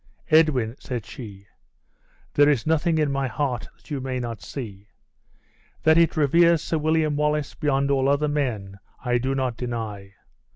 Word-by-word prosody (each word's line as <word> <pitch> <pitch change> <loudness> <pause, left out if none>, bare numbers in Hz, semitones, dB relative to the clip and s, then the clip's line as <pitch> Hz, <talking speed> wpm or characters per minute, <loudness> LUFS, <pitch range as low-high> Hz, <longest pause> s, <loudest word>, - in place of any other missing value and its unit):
"Edwin," 140 -8 +4
said 120 -4 -5
she, 100 -5 -10 0.9
"there 145 0 +5
is 140 -6 +1
nothing 160 +1 +2
in 150 -2 +1
my 135 -1 0
heart 125 -1 -2
that - - -21
you 140 -2 -2
may 130 0 -3
not 115 -2 -5
see. 105 -7 -8 1.0
That 160 0 +5
it 165 -2 +3
reveres 170 +2 +4
Sir 160 - -1
William 155 -1 +1
Wallace 150 0 0
beyond 140 -2 0
all 135 -1 +2
other 145 +2 +2
men, 110 -10 -2 0.3
I 120 0 +2
do 135 +2 -1
not 130 -3 -1
deny. 110 -5 -5
135 Hz, 160 wpm, -24 LUFS, 120-150 Hz, 1.0 s, there